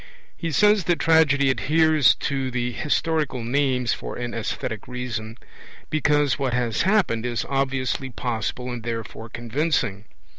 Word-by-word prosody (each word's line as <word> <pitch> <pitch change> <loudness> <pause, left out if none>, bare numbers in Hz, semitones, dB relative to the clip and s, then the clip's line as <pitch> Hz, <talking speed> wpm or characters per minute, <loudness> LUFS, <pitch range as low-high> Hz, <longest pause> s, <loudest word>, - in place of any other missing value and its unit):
He 165 -2 -4
says 210 +3 +4
that 175 0 +2
tragedy 145 -4 +4
adheres 155 0 +4
to 135 -2 -1
'the 125 -1 -2
historical 150 -2 -1
names' 125 0 +1
for - - -6
an 120 -1 -4
aesthetic 110 -1 -4
reason, 120 -3 -5 0.5
because 145 -2 +2
what 130 -3 0
has 120 -3 0
happened 190 - +2
is 120 -1 -2
obviously 135 -1 -1
possible 125 0 -3
and 120 -1 -5
therefore 115 0 -5
convincing. 120 -3 -1
130 Hz, 135 wpm, -24 LUFS, 120-150 Hz, 0.5 s, says